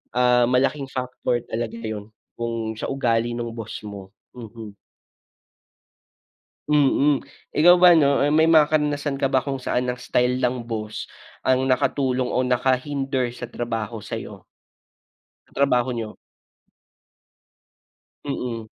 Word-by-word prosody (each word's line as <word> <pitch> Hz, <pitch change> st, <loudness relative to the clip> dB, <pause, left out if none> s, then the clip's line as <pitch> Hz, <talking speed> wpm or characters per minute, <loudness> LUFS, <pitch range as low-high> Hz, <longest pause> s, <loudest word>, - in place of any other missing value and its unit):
ah, 125 Hz, -1 st, +4 dB
malaking 135 Hz, +3 st, +1 dB
factor 125 Hz, -2 st, -2 dB
talaga 115 Hz, 0 st, -3 dB
yun 110 Hz, -2 st, -5 dB, 0.3 s
kung 115 Hz, -1 st, -3 dB
sa -, -, -3 dB
ugali 120 Hz, -3 st, 0 dB
ng 120 Hz, -1 st, -4 dB
boss 115 Hz, -2 st, -7 dB
mo, 100 Hz, -2 st, -9 dB, 0.2 s
mhm. 115 Hz, -2 st, -9 dB, 2.0 s
Mm. 145 Hz, -1 st, +3 dB, 0.3 s
Ikaw 175 Hz, +4 st, +6 dB
ba 180 Hz, 0 st, +8 dB
'no, 140 Hz, -3 st, +4 dB
eh, 145 Hz, -, +1 dB
may 160 Hz, +1 st, +4 dB
mga 160 Hz, -2 st, +7 dB
karanasan 145 Hz, -2 st, 0 dB
ka 135 Hz, -, +2 dB
ba 135 Hz, -, +2 dB
kung 135 Hz, -2 st, -3 dB
saan 125 Hz, 0 st, -1 dB
ang 125 Hz, 0 st, -3 dB
style 125 Hz, 0 st, +1 dB
ng 125 Hz, -1 st, -1 dB
boss 110 Hz, -2 st, -5 dB, 0.4 s
ang 130 Hz, 0 st, +3 dB
nakatulong 130 Hz, 0 st, +1 dB
o 125 Hz, -, +2 dB
nakahinder 130 Hz, +1 st, 0 dB
sa 120 Hz, -, -5 dB
trabaho 115 Hz, -2 st, -4 dB
sa'yo? -, -, -7 dB, 1.0 s
Sa -, -, -26 dB
trabaho 130 Hz, -2 st, +2 dB
niyo. 115 Hz, -2 st, -5 dB, 2.1 s
Mm. 120 Hz, -5 st, -4 dB
125 Hz, 125 wpm, -23 LUFS, 115-140 Hz, 2.1 s, ba